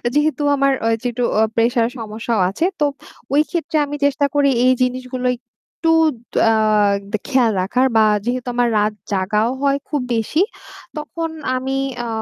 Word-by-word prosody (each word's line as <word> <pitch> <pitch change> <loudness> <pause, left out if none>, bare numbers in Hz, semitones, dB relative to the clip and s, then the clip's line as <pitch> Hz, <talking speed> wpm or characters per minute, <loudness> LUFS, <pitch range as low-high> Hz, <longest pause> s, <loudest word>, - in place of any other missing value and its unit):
যেহেতু 295 -1 +1
আমার 275 0 +2
ঐযে 230 +2 0
একটু 245 +1 -3 0.2
অ - - +4
প্রেশার 230 0 +2
সমস্যাও 220 0 -3
আছে। 205 - -1
তো 295 - +3 0.5
ওই 290 - +5
ক্ষেত্রে 330 -2 -2
আমি 290 - -5
চেষ্টা 285 0 +2
করি 285 -1 +4 0.2
এই 255 - +6
জিনিসগুলো 255 0 -1
একটু 255 +7 -4 0.6
আ - - +4 0.6
দ - - +3
খেয়াল 255 -5 +3
রাখার 250 +8 +1
বা 220 - +6 0.2
যেহেতু 250 +1 -2
আমার 245 0 +2
রাত 210 +1 +1 0.2
জাগাও 205 +3 +1
হয় 280 0 +2
খুব 295 -3 -1
বেশি 230 - 0 0.6
তখন 325 +2 -4 0.3
আমি 265 +1 -2 0.3
আ - - -4
255 Hz, 155 wpm, -19 LUFS, 230-285 Hz, 0.6 s, এই